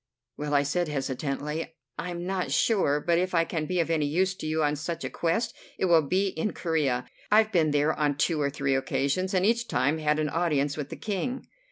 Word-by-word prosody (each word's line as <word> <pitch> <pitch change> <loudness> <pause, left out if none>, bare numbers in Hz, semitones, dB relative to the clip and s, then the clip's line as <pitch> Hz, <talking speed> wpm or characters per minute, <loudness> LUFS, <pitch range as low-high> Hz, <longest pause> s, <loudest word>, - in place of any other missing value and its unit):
"Well," 150 0 -2
I 140 - +4
said 175 +5 0
hesitatingly, 145 +3 -3 0.2
"I'm 175 0 -4
not 185 -1 -2
sure, 185 -10 +2
but 170 +2 +2
if 185 0 -1
I 165 0 +4
can 160 -2 -3
be 180 -1 0
of 165 0 +1
any 155 -3 +1
use 185 +6 +1
to 155 - -5
you 155 0 +1
on 150 0 +2
such 165 +3 -4
a - - -4
quest 220 +8 0 0.2
it - - +1
will 170 -3 +5
be 185 +7 +1
in 190 +4 -2
Corea. 145 -7 0 0.2
I've 215 +1 +5
been 165 -6 +3
there 150 +1 +2
on 145 -2 0
two 155 0 +1
or 140 - +2
three 140 -1 -1
occasions, 140 +7 0
and 185 +1 +3
each 235 +2 +2
time 140 +5 +1
had 150 0 +1
an 155 -1 0
audience 145 -4 0
with 145 -2 -5
the - - -6
King." 245 +6 -3
160 Hz, 220 wpm, -27 LUFS, 145-180 Hz, 0.2 s, will